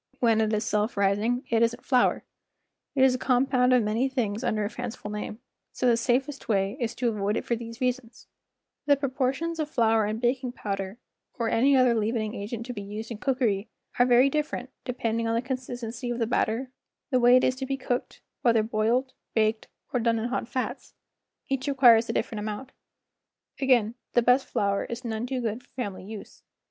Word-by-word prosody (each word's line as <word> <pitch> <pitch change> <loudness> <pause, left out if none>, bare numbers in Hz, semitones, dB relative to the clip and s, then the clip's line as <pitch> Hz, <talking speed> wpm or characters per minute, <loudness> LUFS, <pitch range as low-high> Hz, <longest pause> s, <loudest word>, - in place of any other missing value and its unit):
When 225 -2 +3
it 220 -1 +1
is 215 0 0
self 210 +1 0
rising, 205 +6 +1
it 230 -1 +3
isn't 230 +1 0
flour; 255 -2 +3 0.7
it 265 - +4
is 265 -1 +6
a 255 - -2
com¬ 255 0 +2
pound 250 -1 +3
of 250 -2 +5
many 225 +6 +1
things 230 -4 -2
under 215 -3 0
a - - -2
fanciful 245 -4 -6
name, 210 0 -5 0.4
so - - -2
the 240 -2 +5
safest 260 +4 -1
way 195 0 +1
is 235 -1 -2
to 245 -1 0
avoid 210 -1 -1
it - - -3
for 235 - 0
these 230 0 -8
reasons: 250 -2 -3 0.6
The 285 - +6
proportions 275 +4 -1
of 305 -1 -1
flour 225 -4 +3
and 215 +2 -2
baking 250 +1 0
powder, 195 -2 -4 0.4
or 230 -2 0
any 270 +5 +4
other 255 -2 +5
leaven¬ 225 +1 0
ing 215 0 -3
agent 225 +2 -5
to 250 - -5
be 205 - -6
used 210 +3 -7
in 220 - -6
cookery, 235 -6 0 0.3
are 245 - +5
very 250 +2 +6
different, 275 -3 -2
depending 230 -2 -1
on 225 - +1
the - - +2
consistency 245 -2 -5
of 240 - -2
the 230 - +1
batter, 245 +2 0 0.4
the 255 - +4
way 245 +1 +6
it 255 - +5
is 255 - +2
to 265 0 -4
be 270 0 -1
cooked—whether 245 -3 -1
boiled, 230 +4 0 0.2
baked, 220 0 +1 0.3
or 250 - +2
done 230 0 +2
in 225 +2 -2
hot 245 -2 -2
fats; 255 0 -4 0.5
each 270 0 -2
requires 240 -5 +5
a - - 0
different 220 - -2
amount. 215 +5 -5 0.9
Again, 245 -5 +3 0.2
the 240 - +4
best 250 +3 +4
flour 200 -1 0
is 235 +2 -6
none 225 +1 -3
too 255 -1 -2
good 225 +1 -2
for - - -28
family 205 -8 -5
use. 210 0 -10
235 Hz, 200 wpm, -27 LUFS, 220-255 Hz, 0.9 s, is